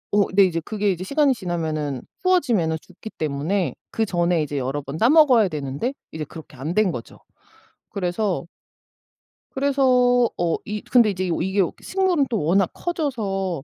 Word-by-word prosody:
어. 205 -1 +4
네 200 +1 +6
이제 175 -3 +1
그게 205 +4 -1
이제 180 0 -4
시간이 280 +4 +3
지나면은 160 - -3 0.2
추워지면은 240 - +2
죽기 190 +4 -11
때문에 155 +2 -2 0.2
그 225 - 0
전에 175 -3 +1
이제 145 -1 -4
여러 135 +2 -2
번 140 +2 -7
따 230 +8 +4
먹어야 270 -9 +6
되는데 150 - -3 0.2
이제 155 -1 -5
그렇게 150 -2 -12
안 150 +6 -3
된 215 -1 +3
거죠. 120 -7 -8 0.7
그래서 185 0 -2 1.1
그래서 255 -3 +3
어 170 -1 0
이 210 0 -4
근데 240 -4 +4
이제 185 -2 -2
이게 190 +3 +1 0.2
식물은 365 -7 +1
또 225 -4 -1
워낙 180 +4 +3
커져서 200 - -2
190 Hz, 315 characters per minute, -23 LUFS, 160-245 Hz, 1.1 s, 네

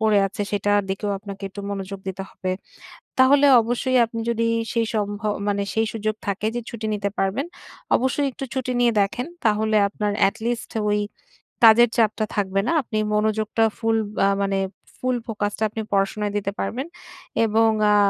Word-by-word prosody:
পড়ে 215 -2 +4
আছে 195 +1 -7
সেটার 205 0 +2
দিকেও 205 +1 -2
আপনাকে 200 -1 -9
একটু 200 +1 -8
মনোযোগ 195 0 -5
দিতে 190 +1 -4
হবে। 185 - -4 0.7
তাহলে 280 +2 +6
অবশ্যই 245 +3 0
আপনি 230 0 -5
যদি 230 0 0 0.3
সেই 230 -2 +1
সম্ভ 205 -1 -1 0.3
মানে 200 0 0
সেই 225 0 +2
সুযোগ 215 -1 -2
থাকে 200 +1 -1
যে 240 - -1
ছুটি 225 -2 -5
নিতে 200 -1 -1
পারবেন। 200 - 0 0.5
অবশ্যই 275 +2 0
একটু 270 - -6
ছুটি 255 -1 -1
নিয়ে 240 -1 +4
দেখেন। 215 +6 0 0.2
তাহলে 215 0 +2
আপনার 210 0 -2 0.2
এটলিস্ট 230 +3 -3 0.2
ওই 210 0 +2 0.7
কাজের 230 +1 +8
চাপটা 220 -1 +2
থাকবে 195 -1 0
না। - - +2
আপনি 220 -3 -4 0.2
মনোযোগটা 215 +1 +1
ফুল 225 -1 +1 0.3
আ - - +5
মানে 195 0 0 0.4
ফুল 255 0 0
ফোকাসটা 210 -1 -2
আপনি 220 +1 -4
পড়াশোনায় 200 +1 0
দিতে 200 -1 -2
পারবেন। 265 +7 -2 0.6
এবং 225 +1 +3 0.2
আ - - +5
215 Hz, 165 wpm, -23 LUFS, 205-230 Hz, 0.7 s, কাজের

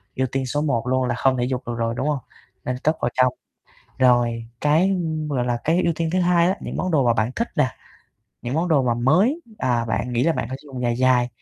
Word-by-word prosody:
ưu 130 0 0
tiên 135 0 -1
số 145 +4 -1
1 125 -6 -1
luôn 130 0 +1
là 120 - -1
không 130 +1 +2
thể 120 0 0
vụt 130 -1 -2
được 120 - -2
rồi, 115 0 -1
đúng 135 - -2
hông? 150 -2 0 0.5
Nên 125 - -1
cất 155 +1 +2
vào 120 - +1
trong. 130 -1 +3 0.7
Rồi 120 -2 +3
cái, 155 +6 +3
ừm, 160 -5 -2
gọi 130 -4 -1
là, 120 -1 0
cái 170 +4 +2
ưu 170 - +2
tiên 165 -1 -1
thứ 185 - +2
hai 175 -1 +3
á, 190 - 0
những - - -6
món 185 - -1
đồ 145 -6 +2
mà 120 - +4
bạn 110 +1 0
thích 235 - -1
nè, 150 -5 +3 0.7
những 120 +2 -3
món 165 +3 0
đồ 150 -5 +3
mà 120 -2 +1
mới, 180 - +2 0.2
à, 120 -2 0
bạn 115 +2 -2
nghĩ 120 0 +1
là 165 - +3
bạn 115 - -3
phải 130 - -4
sử 150 - -16
dụng 130 -2 -6
dài 120 -1 0
dài, 125 -1 +3
130 Hz, 265 wpm, -22 LUFS, 120-160 Hz, 0.7 s, mà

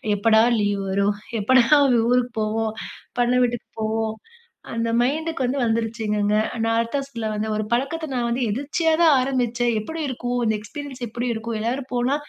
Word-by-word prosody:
"எப்படா 220 +2 +4 0.2
லீவ் 205 -1 0
வரும், 200 +1 +1 0.2
எப்படா 255 +4 +5 0.5
ஊருக்கு 250 0 +2
போவோம், 220 +1 -1 0.5
பண்ணை 245 +1 +3
வீட்டுக்கு 240 -1 -2
போவோம்" 220 +1 0 0.7
அந்த 230 0 -1
மைண்டுக்கு 310 +2 -1
வந்து 270 +3 -1
வந்துருச்சுங்கங்க. 220 -2 0 0.3
நான் 225 0 +1
அதத்தா 230 +5 -1
சொல்ல 230 -4 -4
வந்தேன் 215 +1 -2
ஒரு 215 - -1
பழக்கத்தை 310 +6 -1
நான் 240 -1 0
வந்து 245 +2 -1
எதிர்ச்சியா 295 +7 0
தான் 320 -3 +6
ஆரம்பிச்சேன். 245 -2 0
எப்டி 320 +9 -5
இருக்கும், 245 0 -2
இந்த 220 - +2
எக்ஸ்பீரியன்ஸ் 265 +3 -8
எப்டி 240 +3 -3
இருக்கும், 225 +1 -4
எல்லாரும் 255 +4 -2
போனா 245 +3 +1
240 Hz, 155 wpm, -23 LUFS, 220-260 Hz, 0.7 s, தான்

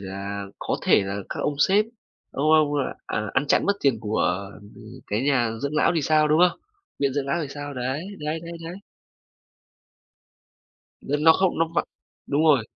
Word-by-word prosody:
là 100 +1 -5
có - - -2
thể - - +4
là 100 +1 -4
các - - -4
ông 145 - -1
sếp, 200 +8 +4 0.5
ông 155 +3 +1
ông, 155 -2 +5 0.4
à, 105 -1 -3
ăn 145 +2 +1
chặn - - +3
mất 200 - +3
tiền 135 -6 +2
của 100 -3 -1 0.6
cái 105 +3 -1
nhà 135 -5 +2
dưỡng 140 +2 -2
lão 170 - +3
thì 160 - +1
sao, 155 +1 +3
đúng 155 +3 +3
không? - - -16 0.4
Viện 140 -2 +1
dưỡng 140 -1 -1
lão 140 - 0
thì 145 - -5
sao? 145 0 -7
Đấy, 130 +5 -3 0.2
đấy, 155 +2 -3
đấy, 170 0 -8
đấy. 170 +2 -6 2.3
N 145 +2 0
nó 160 - +9
không 190 +1 +1
nó 165 0 +2
vào - - +2 0.4
đúng 145 +3 +2
rồi. 145 -8 +4
145 Hz, 185 wpm, -24 LUFS, 115-155 Hz, 2.3 s, nó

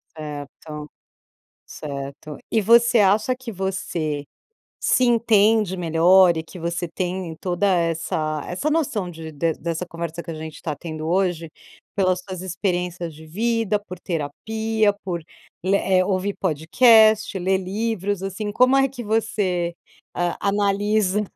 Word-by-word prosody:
Certo, 150 0 -8 0.8
certo. 140 0 -7
E 220 - +3
você 235 +2 +5
acha 210 +5 +3
que 255 -2 -8
você 175 -6 -3 0.5
se 255 - +2
entende 220 -4 +3
melhor 175 +1 +5
e 160 - -3
que 180 - -12
você 170 +1 -2
tem 180 -1 -4
toda 180 +2 0
essa 165 -4 0
essa 235 +13 -2
noção 220 - 0
de 160 -1 -8
de 160 +2 0
dessa 170 +2 -4
conversa 170 0 -6
que 165 - -6
a - - -5
gente 155 0 -8
tá 155 -3 -3
tendo 155 0 -6
hoje, 175 -3 0 0.5
pelas 185 -2 +2
suas 185 -2 -6
experiências 180 -2 -2
de 160 +1 -13
vida, 225 +4 0
por 185 -4 -10
terapia, 215 +8 -1
por, 175 -3 -3 0.4
le 195 +2 +3
eh, 185 -2 +2
ouvir 195 +1 0
podcast 215 - +4
ler 190 +1 +1
livros, 200 0 -2
assim, 205 +2 -3
como 255 +5 +4
é 270 0 +4
que 250 -2 -7
você, 205 -6 0 0.4
hã, 175 -1 0
analisa 205 0 +1
185 Hz, 140 wpm, -22 LUFS, 165-210 Hz, 0.8 s, você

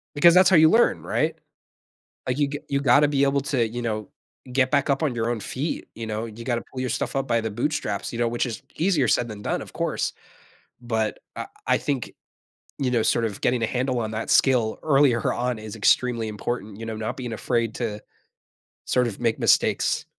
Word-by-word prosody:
Because 170 +4 +7
that's 185 0 +6
how 190 - +5
you 160 -1 +7
learn, 230 +7 +3
right, - - 0 0.9
like, 130 +1 0
you 145 - +3
g 145 0 -4
you 140 - +1
gotta 140 +2 +5
be 140 -1 +1
able 140 0 +2
to, 130 -4 0
you 120 +2 -5
know, 110 -3 -3 0.4
get 130 0 +2
back 140 -1 +2
up 140 +3 +1
on 140 -6 0
your 115 0 -1
own 120 -2 -1
feet, 135 - -4
you 115 - -5
know, 110 +1 -3
you 115 +1 -9
gotta 120 -1 -1
pull 130 - -6
your 130 - -2
stuff - - -2
up 135 0 -1
by 115 -2 +2
the 110 -1 -3
bootstraps, 120 -3 -2
you 115 - -4
know, 120 - +2
which 120 +2 -1
is 120 -3 -5
easier 165 -7 +2
said 120 - +2
than 105 -2 -8
done, - - -2
of - - -10
course, - - -1 0.7
but, 110 -3 -1 0.2
I - - -4 0.2
I - - +3
think, 135 -5 -3 0.7
you 130 -3 0
know, 120 -2 +2
sort 115 - +2
of 105 -3 -5
getting 125 -1 +1
a - - +2
handle 125 +1 -1
on 110 -1 -3
that 110 +1 -4
skill 120 -5 +3
earlier 135 -5 +3
on 125 -1 -2
is 110 0 -8
extremely 115 +1 +2
important, 105 -1 -4
you 115 - -6
know, 110 -1 -4
not 110 0 -4
being 125 -3 -5
afraid 115 0 -1
to 105 -3 -3 0.8
sort 125 -1 +2
of 110 - -6
make 115 -2 0
mistakes, - - +2
120 Hz, 215 wpm, -24 LUFS, 110-135 Hz, 0.9 s, Because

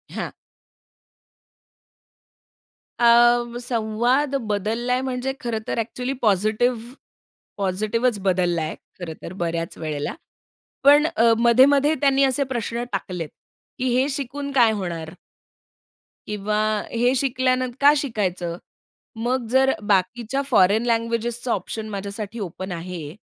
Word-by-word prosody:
हां. - - -4 2.7
अ, 240 0 +4
संवाद 245 +4 0 0.2
बदललाय 230 +5 -1
म्हणजे 260 0 -2
खरंतर 225 -2 -3
ॲक्चुअली 250 +3 -3
पॉझिटिव्ह 220 +4 +1 0.6
पॉझिटिव्हच 215 +4 0
बदललाय 175 -4 0 0.3
खरंतर 170 0 -7
बऱ्याच 165 0 -2
वेळेला. 150 -2 -3 0.7
पण 290 +2 +7
अ, 230 0 +5
मध्ये-मध्ये 270 +5 +5
त्यांनी 275 -1 +4
असे 270 +1 +2
प्रश्न 235 0 -2
टाकलेत, 180 -5 -4 0.5
की 255 - -2
हे 265 +2 +2
शिकून 280 +1 -4
काय 240 -5 +5
होणार? 170 -6 -4 1.2
किंवा 210 0 -1 0.3
हे 240 +2 +2
शिकल्यानंतर, 255 -1 0
का 290 +1 +7
शिकायचं? 185 - -2 0.6
मग 245 +2 -1
जर 265 +1 +4 0.2
बाकीच्या 225 +7 +1
फॉरेन 215 +1 +4
लँग्वेजेसचा 230 +1 -1
ऑप्शन 215 +3 -4
माझ्यासाठी 200 +2 -5
ओपन 185 -1 -6
आहे 170 -2 -6
230 Hz, 100 wpm, -23 LUFS, 195-255 Hz, 2.7 s, पण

